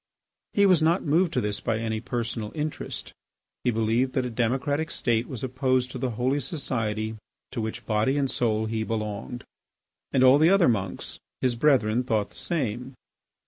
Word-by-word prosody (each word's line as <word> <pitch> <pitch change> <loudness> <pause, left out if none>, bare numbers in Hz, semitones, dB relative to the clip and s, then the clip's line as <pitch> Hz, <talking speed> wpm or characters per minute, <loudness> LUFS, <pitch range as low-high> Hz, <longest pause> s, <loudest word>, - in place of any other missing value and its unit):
He 200 - +4
was 185 -5 +5
not 165 +4 +2
moved 165 +3 +3
to - - +1
this 105 -1 -2
by 115 - -1
any 110 -1 -2
personal 115 -3 -3
interest. 155 0 -4 0.5
He - - +2
believed 115 +3 +1
that 130 -3 0
a 125 - -3
democratic 135 +7 0
state 120 -6 0
was 130 -2 -6
opposed 130 -1 0
to 130 - -6
the 130 0 -1
holy 130 +4 +1
society 110 -6 -2 0.3
to 115 - -3
which 110 0 -4
body 110 +6 +1
and 140 - +2
soul 110 -4 0
he 110 0 -2
belonged. 110 +2 -4 0.7
And 130 - +3
all 130 +2 +7
the 160 +2 +6
other 195 -2 +5
monks, 100 -6 -1 0.2
his 125 -1 +1
brethren, 120 -3 +3
thought 110 -4 0
the - - -21
same. 130 -5 -3
125 Hz, 175 wpm, -26 LUFS, 110-140 Hz, 0.7 s, all